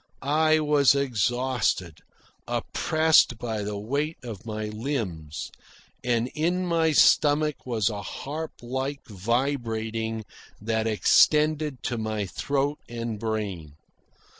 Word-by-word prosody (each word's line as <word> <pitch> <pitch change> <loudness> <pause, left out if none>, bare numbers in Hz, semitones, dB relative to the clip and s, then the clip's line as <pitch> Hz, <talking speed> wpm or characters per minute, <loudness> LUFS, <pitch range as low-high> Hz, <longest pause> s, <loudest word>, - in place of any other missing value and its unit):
I 155 +2 +3
was 145 -3 +4
exhausted, 120 - 0 0.5
oppressed 155 -6 +3
by 110 -2 -3
the 105 0 -3
weight 140 +9 -2
of 115 -3 -8
my 110 0 -3
limbs, 105 - -4 0.5
and 120 -1 +1
in 175 +4 0
my 165 -2 +2
stomach 150 -1 +3
was 115 -5 +1
a 105 -3 -2
harp 150 +10 -5
like 130 +3 -3
vibrating 115 0 -2 0.4
that 110 +1 -1
extended 150 +3 +3
to 120 - -2
my 110 -2 -2
throat 140 +8 -1
and 115 -2 -4
brain. 100 -9 -3
120 Hz, 110 wpm, -26 LUFS, 110-145 Hz, 0.5 s, was